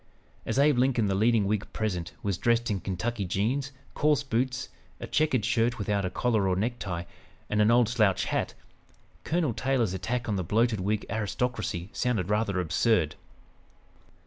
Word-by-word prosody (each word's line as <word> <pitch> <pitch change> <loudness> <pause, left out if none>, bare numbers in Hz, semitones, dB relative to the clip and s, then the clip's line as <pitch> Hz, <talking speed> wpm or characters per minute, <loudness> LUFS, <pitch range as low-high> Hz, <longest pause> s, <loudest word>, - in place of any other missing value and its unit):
As - - -1
Abe 140 -2 +4
Lincoln, 125 -3 +2
the 100 - +1
leading 110 +1 +3
Whig 105 +1 -1
present, 90 -6 -2
was 100 -4 -1
dressed 120 -1 +2
in 100 - -1
Kentucky 105 +4 -3
jeans, 115 +10 -1 0.2
coarse 150 -1 +2
boots, 130 0 -1 0.3
a - - -5
checkered 150 -8 +1
shirt 120 -1 +1
without 100 -1 -1
a - - -1
collar 110 0 +1
or 95 - +2
necktie, 100 -4 -2 0.5
and 105 - +3
an 105 - +4
old 120 -1 +5
slouch 110 -5 +2
hat, - - -2 0.7
Colonel 160 -7 0
Taylor's 125 -6 0
attack 120 +6 -2
on 105 -3 0
the 95 - -1
"bloated 110 +4 +1
Whig 105 +3 -1
aristocracy" 105 -4 -2
sounded 110 -7 -1
rather 105 -3 +1
absurd. 85 -1 +2
110 Hz, 160 wpm, -28 LUFS, 100-125 Hz, 0.7 s, old